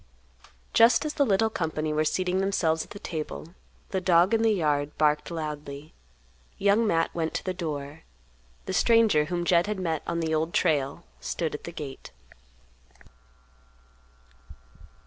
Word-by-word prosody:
Just 230 +7 +5
as 300 - -2
the 285 -2 +2
little 220 +2 +2
company 155 -4 -2
were 155 +1 +2
seating 185 +2 0
themselves 170 -5 +1
at - - -16
the - - -9
table, 165 -3 -6 0.4
the 190 - -1
dog 180 +2 +4
in 225 - +3
the 225 - +4
yard 150 -7 0
barked 150 -1 +2
loudly. 150 -2 -6 0.6
Young 205 +3 +3
Matt 165 -3 +1
went 160 -1 -2
to - - -2
the 185 - -2
door. 155 -3 -5 0.6
The 190 - -4
stranger, 220 -8 +4
whom 175 +1 -2
Jed 175 +1 +3
had 210 -1 -2
met 165 -4 -1
on 170 - -1
the 160 -1 -1
Old 160 +2 -1
Trail, 150 -1 +1 0.2
stood 160 -3 -3
at 150 - -7
the 170 - -6
gate. 145 -5 -8
170 Hz, 150 wpm, -27 LUFS, 155-190 Hz, 0.6 s, Just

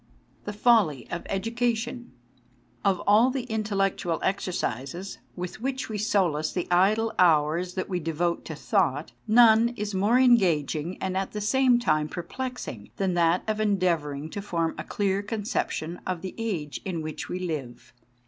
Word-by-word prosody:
THE 205 - -3
FOLLY 205 - +3
OF 170 - -4
EDUCATION 235 +3 -2 0.7
OF 190 -3 +2
all 215 +5 +5
the 260 -1 -2
intellectual 200 -7 -1
exercises 180 - -3 0.2
with 180 +4 -6
which 260 0 -3
we 215 -1 -3
solace 180 -8 +1
the 180 - -2
idle 215 +5 +3
hours 170 +1 +3
that 185 - -2
we 180 -2 -2
devote 170 +1 -1
to 160 - -6
thought, 145 0 0 0.2
none 225 0 +6
is 210 -1 -3
more 205 +6 +3
engaging 180 - +3
and 190 -1 -2
at 190 0 -2
the 210 - -3
same 250 +4 +3
time 155 -10 +1
perplexing 180 - -6
than 190 -2 0
that 170 0 +2
of 215 0 -1
endeav 185 -5 +2
ouring 145 +1 -6
to 200 - -4
form 170 -5 -1
a - - -3
clear 200 -1 0
conception 200 -5 -3
of 185 -2 -3
the 185 - -5
age 175 -11 -3
in 170 -4 -3
which 155 -1 -6
we 180 - -2
live. 145 -9 -5
190 Hz, 160 wpm, -26 LUFS, 165-220 Hz, 0.7 s, none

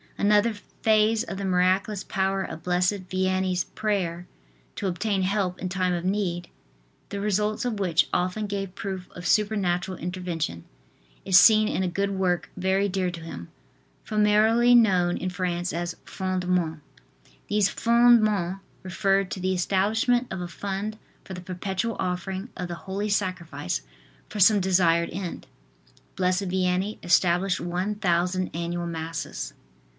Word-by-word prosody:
Another 210 +2 +3 0.3
phase 220 +1 +3
of 195 -5 -6
the 200 - -3
miraculous 185 +2 +1
power 195 0 0
of 160 - -7
blessed 180 +2 0
Vianney's 185 -1 0
prayer 180 -4 -2 0.5
to 200 - -2
obtain 190 +2 -1
help 185 -1 0
in 185 - -3
time 185 -1 0
of 175 0 -3
need, 185 -3 -1 0.6
the 200 - -4
results 210 +2 0
of 225 -4 -2
which 175 -4 +2
often 185 +4 0
gave 195 -2 -4
proof 190 -2 -5
of 175 0 -6
supernatural 190 -4 +1
intervention, 175 - -4 0.6
is 185 -1 +7
seen 215 -1 +6
in 190 - -1
a - - 0
good 200 +3 -1
work 185 -3 0
very 190 +2 +1
dear 185 -1 -1
to 170 -1 -8
him, 85 - -8 0.5
familiarly 215 +3 +4
known 185 -7 +4
in 185 - -3
France 180 -1 -2
as 170 +1 -3
"Fondements." 180 -4 -1 0.7
These 205 -1 +2
"Fondements" 215 -6 +3 0.2
referred 195 0 +1
to - - -4
the 185 +1 0
establishment 215 +7 +1
of 190 - -4
a 175 - -4
fund 200 +4 -4 0.3
for 190 - -9
the 180 - -7
perpetual 190 +4 -3
offering 190 +3 -3
of 180 - -4
the 175 - -5
Holy 200 +2 -2
Sacrifice 170 - -2 0.5
for 210 - -6
some 205 +2 +6
desired 175 -3 +3
end. 180 -1 -5 0.7
Blessed 185 +1 +1
Vianney 185 +2 -1
established 180 +2 +3
one 180 +4 -2
thousand 180 -1 0
annual 170 +1 -3
Masses. 165 -1 -5
185 Hz, 140 wpm, -26 LUFS, 180-205 Hz, 0.7 s, is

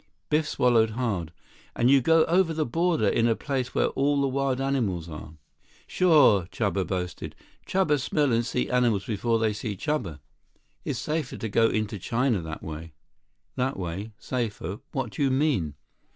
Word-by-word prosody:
Biff 150 0 +2
swallowed 115 -3 +3
hard. 100 -11 -2 0.4
"And 120 +2 +3
you 140 -1 +6
go 165 +4 +4
over 170 -1 +2
the 155 -1 0
border 165 - +1
in 115 +3 +2
a 115 - +2
place 130 -2 -3
where - - +2
all 140 +1 +1
the 140 - +2
wild 135 -1 0
animals 115 -12 -1
are?" 75 -1 -9 0.5
"Sure," 140 - +4
Chuba 100 -5 -1
boasted. 90 -2 -4 0.3
"Chuba 180 -6 +2
smell 145 -1 +1
and 115 +1 +2
see 125 +1 -1
animals 120 -6 +1
before 115 +1 0
they 110 -1 +1
see 105 -1 -5
Chuba. 110 - -2 0.7
Is - - -3
safer 155 -4 -3
to 115 - -4
go 115 +3 +4
into 110 -1 -2
China 120 0 0
that 80 -1 -7
way." 80 0 -7 0.6
"That 130 +2 -1
way? 95 +4 -5
Safer? 105 -6 -4
What 130 -4 -3
do - - -6
you 140 - +3
mean?" 130 - +1
120 Hz, 165 wpm, -26 LUFS, 100-140 Hz, 0.7 s, you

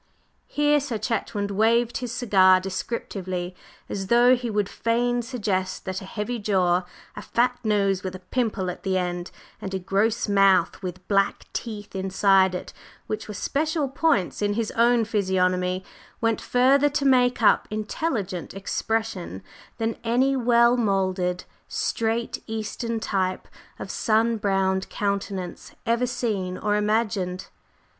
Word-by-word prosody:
Here 295 0 +2
Sir 270 -5 -3
Chetwynd 210 -2 -2
waved 230 +3 +2
his 245 -2 -4
cigar 190 -6 +5
descriptively, 185 -2 -4 0.3
as 195 -1 -4
though 240 +3 +6
he 245 -1 -4
would 210 -2 0
fain 240 +3 0
suggest 205 -7 -2
that 190 0 -3
a - - -8
heavy 220 +5 -4
jaw, 185 -3 +2 0.3
a - - -6
fat 245 +1 0
nose 200 -3 +1
with 185 -1 -5
a - - -8
pimple 215 -7 0
at - - -11
the 190 -1 0
end, 175 -1 -2 0.3
and 190 -1 -4
a - - +1
gross 200 +5 0
mouth 195 -4 +3
with 185 0 -7
black 195 -1 +1
teeth 210 -4 -6
inside 190 0 +3
it, 180 - -6 0.3
which 215 - -4
were 210 - -6
special 305 - -1
points 270 - +1
in 205 0 +1
his 225 -1 -1
own 235 0 +3
physiognomy, 185 -3 0 0.3
went 225 -1 0
further 270 +3 +4
to 285 0 -1
make 250 -3 +3
up - - +4
"intelligent 215 - -3
expression" 195 - -3 0.3
than 225 0 -2
any 255 +4 +2
well 235 -1 +4
moulded, 185 -4 0 0.2
straight, 230 +1 -1
Eastern 225 +1 -3
type 190 -4 -1 0.3
of - - -6
sun 225 +1 +2
browned 195 -2 0
countenance 200 -3 -3
ever 235 +2 +1
seen 210 -7 -2
or 210 -1 0
imagined. 210 -4 -1
210 Hz, 140 wpm, -25 LUFS, 190-235 Hz, 0.3 s, though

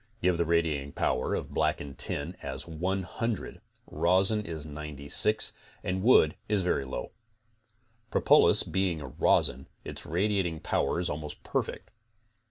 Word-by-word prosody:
Give 90 -2 +2
the 85 - +2
radiating 80 -4 0
power 65 - 0
of - - -5
blackened 70 -1 -1
tin 80 +6 -2
as - - -5
100, 95 +6 -3 0.2
rosin 95 +5 +1
is 80 -5 -6
96 75 +7 +2 0.3
and 95 +1 -2
wood 95 -9 +5
is 105 -3 +2
very 80 -6 0
low. 65 - -5 1.0
Propolis, - - +5
being 95 -4 -1
a 75 - -7
rosin 65 +1 +1 0.2
its - - -6
radiating 90 -2 0
power - - 0
is 90 - -1
almost 75 -1 -6
perfect. - - -3
85 Hz, 130 wpm, -29 LUFS, 75-95 Hz, 1.0 s, wood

